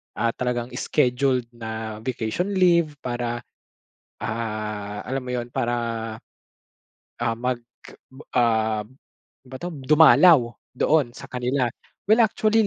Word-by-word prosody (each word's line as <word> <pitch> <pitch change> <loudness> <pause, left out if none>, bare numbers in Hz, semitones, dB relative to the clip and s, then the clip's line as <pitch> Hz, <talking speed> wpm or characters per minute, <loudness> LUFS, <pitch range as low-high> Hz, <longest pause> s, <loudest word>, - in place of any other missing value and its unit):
ah, 115 +1 +1
talagang 125 0 -3
scheduled 130 0 +1
na 110 -2 -6
vacation 115 - -2
leave. 170 -5 +3
Para, 120 -1 -3 0.7
ah, 105 -2 -4
alam 135 +1 -2
mo 125 - -8
yun 120 -1 -4
para, 120 -2 0 1.4
ah, 115 -1 0
mag, 125 +1 -2 0.8
um, 110 -3 +2 0.6
ba 130 +1 -8
'to 175 +4 -5
dumalaw 150 -1 +6 0.2
doon 135 -3 +2
sa - - -11
kanila. 125 0 0 0.4
Well, 225 +2 +7
actually 220 0 +2
125 Hz, 110 wpm, -24 LUFS, 115-140 Hz, 1.4 s, Well